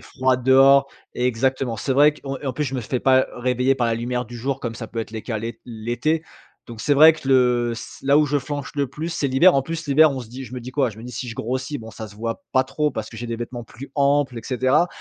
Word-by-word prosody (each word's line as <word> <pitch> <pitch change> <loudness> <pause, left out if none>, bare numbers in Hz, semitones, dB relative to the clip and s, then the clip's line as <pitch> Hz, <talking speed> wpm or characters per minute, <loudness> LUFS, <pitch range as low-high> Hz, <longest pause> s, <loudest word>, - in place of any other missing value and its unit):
froid 130 -2 0
dehors 135 +2 +5 0.3
exactement. 125 0 0
C'est 135 +5 -1
vrai 145 +3 +5
qu'on 135 -2 -6
et 145 - -8
en 130 - -1
plus, 150 +4 -2
je 135 - -4
me 125 - -2
fais 125 +3 -3
pas 130 -1 +4
réveiller 125 +2 +1
par 125 -3 0
la 115 - +1
lumière 125 +2 -2
du 120 +1 -10
jour, 130 +3 -3
comme 115 -2 -4
ça 115 -1 -6
peut 115 - -4
être 110 - -6
les 110 -1 -6
cas, 110 -4 -3
l'é 115 +1 -6
l'été 120 +7 -2 0.4
donc 115 -2 -8
c'est 145 - +2
vrai 155 +3 +8
que 155 - -11
le 125 -3 +3
c 115 - -10
là 140 +2 +5
où 150 - +3
je 145 +1 0
flanche 145 -1 -5
le 140 -1 0
plus, 150 +6 -6
c'est 165 -4 -1
l'hiver. 135 +8 +5
En 135 - +2
plus, 165 +2 -5
l'hiver, 155 +2 +5
on 135 - -4
se 120 - -10
dit 130 +3 -8
je 125 - -12
me 125 - -5
dis 125 +2 -8
quoi? 130 -2 +1
Je 110 - -14
me 115 - -10
dis: 125 - -8
«Si 125 +2 -5
je 115 - -6
grossis, 130 +5 -3
bon, 110 -1 -10
ça 110 0 -8
se 100 - -15
voit 115 - -4
pas 130 - +4
trop 150 +3 -1
parce 110 - -5
que 115 - -12
j'ai 120 +2 -5
des 115 -1 -3
vêtements 120 0 -6
plus 130 +5 -11
amples» 140 -3 +2
et - - -9
cetera. 130 +6 +2
130 Hz, 290 wpm, -22 LUFS, 120-140 Hz, 0.4 s, vrai